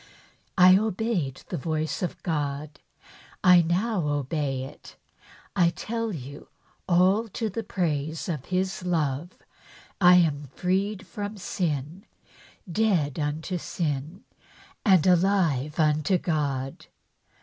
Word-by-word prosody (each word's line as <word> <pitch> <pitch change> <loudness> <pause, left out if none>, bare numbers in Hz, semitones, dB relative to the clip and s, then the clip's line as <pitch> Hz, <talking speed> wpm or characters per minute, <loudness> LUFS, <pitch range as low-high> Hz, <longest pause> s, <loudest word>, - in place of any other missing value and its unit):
I 185 +1 +8
obeyed 205 - -2
the 175 - -3
voice 155 +2 -2
of 180 - -4
God; 145 -2 -3 0.6
1 180 -2 +6
now 185 -1 0
obey 145 -2 -1
it, 135 - -11 0.6
and 175 -3 +3
tell 230 0 -3
you 140 -4 -8 0.4
all 185 +6 +4
to 220 +1 -3
the 230 - -3
praise 160 -6 -2
of 150 -7 -3
His 185 0 -2
love, 165 -2 -1 0.6
I 180 0 +8
am 150 -5 +2
freed 195 +2 -1
from 205 +2 -6
sin, 165 -2 -3 0.6
dead 170 -9 +1
unto 155 +5 -2
sin 155 +2 -3 0.6
and 190 -8 +5
alive 175 -6 +2
unto 155 +3 +3
God. 140 -6 -2
170 Hz, 110 wpm, -26 LUFS, 150-190 Hz, 0.6 s, I